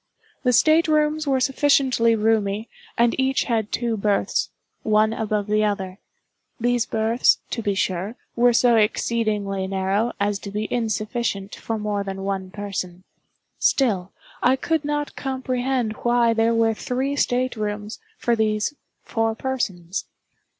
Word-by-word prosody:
The 250 - +2
state 315 +7 +4
rooms 305 0 +1
were 270 -1 +2
sufficiently 260 -4 +3
roomy, 215 -1 +1 0.3
and 235 0 +4
each 265 0 +2
had 225 -4 -1
two 235 -2 -1
berths, 205 -1 0 0.3
one 215 0 +3
above 215 -2 -1
the 215 +1 +1
other. 195 -2 -2 0.6
These 240 0 +1
berths, 225 +2 +3
to 230 - -2
be 205 -2 -1
sure, 190 +3 -1 0.2
were 245 +1 +5
so 240 0 +4
exceedingly 210 -3 0
narrow 195 +4 0
as 200 0 0
to 200 - -7
be 210 +2 -3
insufficient 215 -3 -2
for 225 - -4
more 210 -1 -2
than 195 -1 -5
one 195 -1 -3
person; 185 -3 -5 0.6
still, 200 -9 +2 0.3
I 255 +2 +4
could 320 +3 -1
not 295 0 -2
comprehend 260 -3 -1
why 240 -1 +2
there 225 +1 +2
were 225 0 +3
three 260 +5 -2
state 255 -2 0
rooms 210 0 -4 0.2
for 235 - +1
these 215 +3 0 0.3
four 225 -1 -1
persons. 200 -9 -3
225 Hz, 140 wpm, -23 LUFS, 205-245 Hz, 0.6 s, were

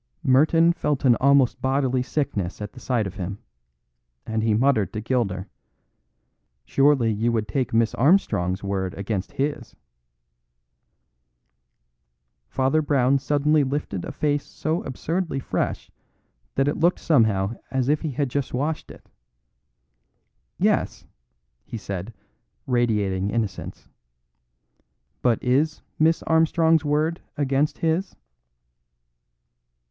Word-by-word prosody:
Merton 160 +6 +4
felt 150 -5 -1
an 120 -2 +6
almost 140 -2 +3
bodily 130 -1 +1
sickness 115 - -2
at 105 -1 -6
the 130 - -11
sight 120 -4 0
of 95 0 -7
him; 95 +1 -4 0.9
and 110 0 -2
he 110 -1 +2
muttered 115 -5 +2
to 105 - -3
Gilder: 105 -5 -1 1.2
"Surely 135 - +3
you 115 +3 0
would 110 -2 -1
take 130 +5 -1
Miss 115 0 +2
Armstrong's 105 - +2
word 95 -1 -2
against 100 -1 -4
his?" 145 +2 -3 2.7
Father 135 +4 +1
Brown 140 -2 +2
suddenly 145 +2 +2
lifted 130 -9 -3
a - - -5
face 145 -1 0
so 160 +3 -3
absurdly 165 +4 -3
fresh - - -3 0.6
that 135 +1 +2
it 145 - 0
looked 175 +2 +3
somehow 110 -8 +2 0.2
as 130 -2 -1
if 150 +1 +2
he 160 - -2
had 140 +1 -1
just 135 0 -2
washed 150 +4 -2
it. - - -14 1.5
"Yes," - - 0 0.6
he 115 - -7
said, 100 0 -6 0.5
radiating 105 -6 0
innocence, 110 -3 -4 1.3
"but 120 -3 +3
is 145 +5 +1 0.2
Miss 160 +1 +3
Armstrong's 160 0 +3
word 155 +3 0 0.2
against 140 +1 0
his?" 165 +4 -1
130 Hz, 115 wpm, -24 LUFS, 110-150 Hz, 2.7 s, an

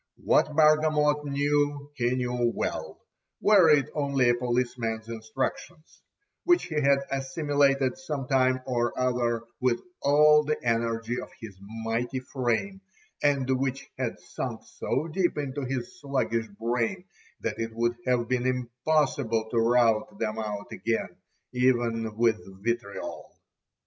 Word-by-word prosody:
What 150 - +3
Bargamot 150 -1 +4
knew 145 0 0
he 125 -2 0
knew 125 -1 0
well, - - -4 0.3
were 200 -6 +6
it 145 -2 +5
only 140 -4 +2
a - - +5
policeman's 120 -2 -2
instructions, 115 +8 -5 0.4
which 350 0 +4
he 155 -4 -2
had 140 0 +4
assimilated 135 +1 +1
some 150 -7 -4
time 130 -1 +2
or 120 -2 -1
other 120 -2 0 0.2
with 125 -2 +1 0.2
all 150 +1 +6
the 150 +1 -1
energy 115 0 0
of - - -9
his 110 -5 -9 0.3
mighty 120 +3 -1
frame, 130 - -2 0.4
and 140 -3 +2
which 135 0 -3
had - - -3
sunk - - -5
so 160 - -2
deep 175 +1 0
into 140 -1 -3
his 135 +9 -4
sluggish 120 -5 -1
brain, 115 - -2 0.4
that - - -3
it 115 0 -2
would 120 +1 +1
have 120 -2 +2
been 125 0 0
impossible 125 -2 0
to 115 - +2
rout 115 -2 +2
them 110 0 -2
out 105 -2 -5
again, 110 -6 -2 0.4
even 120 -3 +1
with 115 -1 +3 0.2
vitriol. 115 -3 -4
125 Hz, 130 wpm, -27 LUFS, 115-145 Hz, 0.4 s, were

